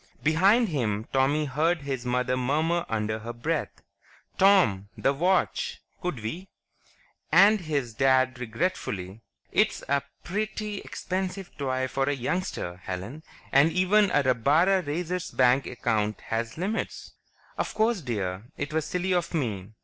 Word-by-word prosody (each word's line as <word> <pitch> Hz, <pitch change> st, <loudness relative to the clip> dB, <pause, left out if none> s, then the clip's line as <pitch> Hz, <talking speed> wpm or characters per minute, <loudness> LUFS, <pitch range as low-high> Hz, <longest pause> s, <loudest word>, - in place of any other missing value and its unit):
Behind 195 Hz, +9 st, +4 dB
him, 110 Hz, -8 st, -1 dB
Tommy 140 Hz, +3 st, +2 dB
heard 155 Hz, +4 st, 0 dB
his 130 Hz, -3 st, -4 dB
mother 125 Hz, +1 st, +1 dB
murmur 155 Hz, +7 st, 0 dB
under 110 Hz, 0 st, -1 dB
her 115 Hz, +2 st, -6 dB
breath, 150 Hz, +7 st, -3 dB, 0.6 s
"Tom... 175 Hz, -, +4 dB
the 135 Hz, -, +2 dB
watch; 190 Hz, -, 0 dB, 0.2 s
could 180 Hz, -, -3 dB
we?" 170 Hz, -, -5 dB, 0.8 s
And 210 Hz, +1 st, +6 dB
his 140 Hz, -8 st, -2 dB
Dad 130 Hz, +1 st, +3 dB
regretfully, 115 Hz, -, -3 dB, 0.3 s
"It's -, -, +2 dB
a 140 Hz, 0 st, +2 dB, 0.2 s
pretty 210 Hz, +1 st, -3 dB
expensive 185 Hz, 0 st, -4 dB
toy 130 Hz, -2 st, -1 dB
for 135 Hz, +1 st, 0 dB
a -, -, +1 dB
youngster, 130 Hz, -, -3 dB
Helen. 95 Hz, +11 st, -6 dB, 0.3 s
And 140 Hz, +4 st, +5 dB
even 190 Hz, +3 st, +3 dB
a 145 Hz, -5 st, +2 dB
rabbara 145 Hz, +10 st, +3 dB
raiser's 175 Hz, +3 st, -3 dB
bank 130 Hz, +1 st, +3 dB
account 110 Hz, -3 st, -1 dB
has 115 Hz, +3 st, -3 dB
limits." 200 Hz, +6 st, -3 dB, 0.4 s
"Of -, -, -3 dB
course, 220 Hz, -2 st, +2 dB
dear; 100 Hz, -6 st, -3 dB
it 145 Hz, +1 st, -4 dB
was 160 Hz, -1 st, 0 dB
silly 180 Hz, +2 st, -1 dB
of 175 Hz, -1 st, -1 dB
me." 110 Hz, -, -3 dB
140 Hz, 135 wpm, -27 LUFS, 120-180 Hz, 0.8 s, And